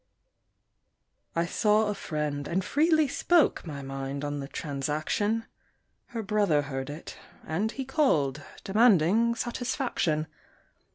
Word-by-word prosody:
I 170 Hz, 0 st, +2 dB
saw 210 Hz, +5 st, +2 dB
a 210 Hz, -, 0 dB
friend, 150 Hz, -6 st, -3 dB
and 185 Hz, +2 st, -1 dB
freely 315 Hz, -, +3 dB
spoke 330 Hz, -, +2 dB
My 140 Hz, -3 st, -6 dB
mind 135 Hz, +1 st, -4 dB
on 145 Hz, 0 st, -3 dB
the 135 Hz, -, -5 dB
transaction; 155 Hz, +11 st, -1 dB, 0.6 s
Her 230 Hz, -2 st, -5 dB
brother 195 Hz, -8 st, +2 dB
heard 135 Hz, -1 st, -4 dB
it, 150 Hz, +3 st, -8 dB, 0.3 s
and 200 Hz, +8 st, -1 dB
he 270 Hz, +1 st, -5 dB
called, 160 Hz, -, +1 dB, 0.2 s
Demanding 215 Hz, +1 st, +4 dB
satisfaction. 235 Hz, -, -1 dB
175 Hz, 115 wpm, -28 LUFS, 145-230 Hz, 0.6 s, Demanding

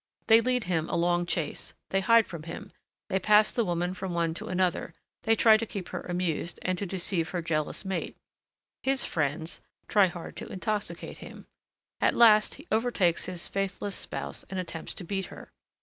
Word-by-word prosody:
They 225 Hz, +1 st, +7 dB
lead 250 Hz, 0 st, +1 dB
him 165 Hz, -4 st, -1 dB
a -, -, -1 dB
long 175 Hz, 0 st, +2 dB
chase, 165 Hz, -3 st, -3 dB, 0.2 s
they 195 Hz, -, +3 dB
hide 230 Hz, +3 st, +5 dB
from 170 Hz, -3 st, -7 dB
him, 195 Hz, +5 st, -8 dB, 0.4 s
they 190 Hz, -, 0 dB
pass 210 Hz, +2 st, +5 dB
the 235 Hz, -, +1 dB
woman 175 Hz, -1 st, -1 dB
from 185 Hz, -1 st, -4 dB
one 165 Hz, -1 st, +1 dB
to -, -, -5 dB
another, 180 Hz, -2 st, 0 dB, 0.3 s
they 225 Hz, 0 st, +5 dB
try 220 Hz, 0 st, +7 dB
to 230 Hz, -, -2 dB
keep 195 Hz, -4 st, -6 dB
her -, -, -4 dB
amused, 175 Hz, -2 st, -2 dB
and 185 Hz, -, +1 dB
to 200 Hz, -, -2 dB
deceive 175 Hz, -2 st, -1 dB
her 175 Hz, -2 st, -2 dB
jealous 155 Hz, +3 st, -1 dB
mate. 190 Hz, 0 st, -3 dB, 0.6 s
His 270 Hz, 0 st, +1 dB
friends 155 Hz, +1 st, -1 dB, 0.3 s
try 205 Hz, -3 st, +5 dB
hard 175 Hz, -1 st, -8 dB
to -, -, -5 dB
intoxicate 190 Hz, -2 st, -3 dB
him. -, -, -10 dB, 0.5 s
At -, -, +3 dB
last, 215 Hz, -3 st, +6 dB
he 290 Hz, -, -13 dB
overtakes 220 Hz, -7 st, +2 dB
his 180 Hz, -2 st, -4 dB
faithless 195 Hz, 0 st, -2 dB
spouse -, -, -5 dB
and 190 Hz, -, -3 dB
attempts 170 Hz, -3 st, -5 dB
to -, -, -6 dB
beat 190 Hz, +2 st, -2 dB
her. -, -, -12 dB
185 Hz, 185 wpm, -28 LUFS, 170-210 Hz, 0.6 s, They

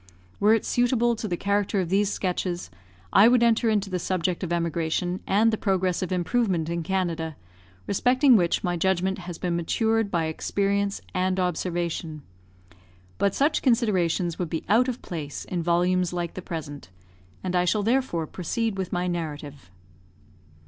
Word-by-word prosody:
Were 215 Hz, +2 st, +5 dB
it 225 Hz, -, -2 dB
suitable 240 Hz, -1 st, +2 dB
to 220 Hz, -, -4 dB
the 175 Hz, -3 st, -2 dB
character 200 Hz, +1 st, 0 dB
of 180 Hz, -3 st, -1 dB
these 200 Hz, +2 st, +2 dB
sketches, 180 Hz, -, -2 dB, 0.4 s
I 200 Hz, +3 st, +8 dB
would 240 Hz, 0 st, +4 dB
enter 230 Hz, 0 st, +3 dB
into 210 Hz, -2 st, +1 dB
the 180 Hz, -, -1 dB
subject 180 Hz, 0 st, -1 dB
of 175 Hz, -, -3 dB
emigration 170 Hz, +1 st, -1 dB
and 220 Hz, +3 st, +3 dB
the 220 Hz, -, -1 dB
progress 190 Hz, -3 st, 0 dB
of 185 Hz, -, -3 dB
improvement 180 Hz, -2 st, 0 dB
in 170 Hz, 0 st, -1 dB
Canada, 165 Hz, -3 st, -2 dB, 0.5 s
respecting 255 Hz, +5 st, +4 dB
which 175 Hz, -5 st, +2 dB
my 175 Hz, -2 st, 0 dB
judgment 190 Hz, +2 st, 0 dB
has 175 Hz, -2 st, -7 dB
been 175 Hz, -1 st, -2 dB
matured 220 Hz, +5 st, +1 dB
by 170 Hz, -4 st, 0 dB
experience 200 Hz, +5 st, -1 dB
and 185 Hz, +1 st, 0 dB
observation; 170 Hz, -3 st, -2 dB, 1.0 s
but 200 Hz, -1 st, +1 dB
such 295 Hz, +3 st, +2 dB
considerations 185 Hz, -, +1 dB
would 175 Hz, -3 st, -2 dB
be 160 Hz, -, -4 dB
out 235 Hz, +5 st, +4 dB
of 255 Hz, -1 st, -4 dB
place 150 Hz, -5 st, -6 dB
in 175 Hz, -2 st, -3 dB
volumes 175 Hz, +1 st, +1 dB
like 175 Hz, -1 st, -3 dB
the 185 Hz, -, -6 dB
present, 145 Hz, -, -7 dB, 0.5 s
and 185 Hz, -1 st, -2 dB
I 180 Hz, 0 st, +3 dB
shall 205 Hz, +4 st, +1 dB
therefore 230 Hz, -8 st, 0 dB
proceed 195 Hz, +5 st, -3 dB
with 185 Hz, -, -3 dB
my 180 Hz, 0 st, -1 dB
narrative. 150 Hz, -, -5 dB
185 Hz, 160 wpm, -25 LUFS, 170-205 Hz, 1.0 s, I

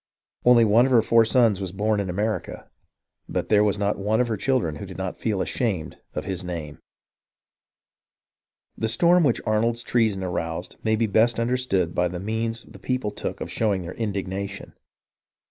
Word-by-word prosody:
Only 120 Hz, -2 st, +7 dB
one 110 Hz, +4 st, +5 dB
of -, -, -3 dB
her 115 Hz, -3 st, +5 dB
four 115 Hz, 0 st, +4 dB
sons 115 Hz, -4 st, +3 dB
was 95 Hz, -2 st, -4 dB
born 105 Hz, +2 st, 0 dB
in 100 Hz, -2 st, -2 dB
America, 105 Hz, +1 st, -3 dB, 0.6 s
but -, -, -2 dB
there 105 Hz, -1 st, +5 dB
was 105 Hz, -1 st, +1 dB
not 100 Hz, 0 st, -1 dB
one 105 Hz, +3 st, +1 dB
of 125 Hz, -1 st, +1 dB
her 110 Hz, -, 0 dB
children 105 Hz, -, 0 dB
who -, -, -7 dB
did -, -, -9 dB
not -, -, -4 dB
feel 100 Hz, -4 st, 0 dB
ashamed 95 Hz, -10 st, -2 dB, 0.2 s
of -, -, -3 dB
his 95 Hz, -1 st, -3 dB
name. 80 Hz, -5 st, -6 dB, 2.0 s
The 110 Hz, -, -1 dB
storm 170 Hz, +10 st, +4 dB
which 125 Hz, -6 st, +2 dB
Arnold's 115 Hz, +2 st, +1 dB
treason 110 Hz, -5 st, +1 dB
aroused 85 Hz, -1 st, -4 dB
may 110 Hz, 0 st, +2 dB
be 115 Hz, +1 st, +1 dB
best 110 Hz, +3 st, +2 dB
understood 115 Hz, -8 st, 0 dB
by 90 Hz, -, +1 dB
the 90 Hz, 0 st, -5 dB
means 115 Hz, +3 st, -3 dB
the -, -, -15 dB
people 125 Hz, -5 st, -2 dB
took 105 Hz, -, -5 dB
of -, -, -5 dB
showing 100 Hz, -5 st, 0 dB
their 85 Hz, -, -6 dB
indignation. 100 Hz, -2 st, -4 dB
105 Hz, 180 wpm, -24 LUFS, 95-115 Hz, 2.0 s, Only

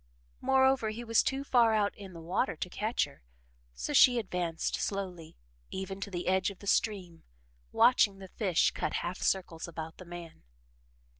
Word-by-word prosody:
Moreover, 265 Hz, -3 st, +3 dB
he 225 Hz, +3 st, -6 dB
was 230 Hz, -1 st, +3 dB
too 270 Hz, +1 st, -2 dB
far 235 Hz, -5 st, +4 dB
out 205 Hz, -1 st, +1 dB
in 195 Hz, -2 st, -10 dB
the 165 Hz, -, -9 dB
water 170 Hz, +1 st, -1 dB
to 180 Hz, -, -5 dB
catch 215 Hz, +3 st, 0 dB
her, -, -, -16 dB, 0.5 s
so -, -, -4 dB
she 245 Hz, -1 st, +7 dB
advanced 180 Hz, -6 st, -2 dB
slowly 180 Hz, -5 st, -4 dB, 0.3 s
even 190 Hz, +1 st, -5 dB
to 200 Hz, -, -4 dB
the 175 Hz, -2 st, -4 dB
edge 190 Hz, +1 st, +2 dB
of 200 Hz, -, -10 dB
the 200 Hz, -, -13 dB
stream, 190 Hz, -5 st, 0 dB, 0.5 s
watching 230 Hz, -4 st, +4 dB
the 190 Hz, 0 st, -10 dB
fish 185 Hz, -3 st, +1 dB
cut -, -, -3 dB
half 175 Hz, +2 st, -4 dB
circles 175 Hz, -4 st, -1 dB
about 160 Hz, -1 st, -7 dB
the 185 Hz, -, -11 dB
man. 170 Hz, -1 st, -10 dB
190 Hz, 170 wpm, -31 LUFS, 175-220 Hz, 0.5 s, she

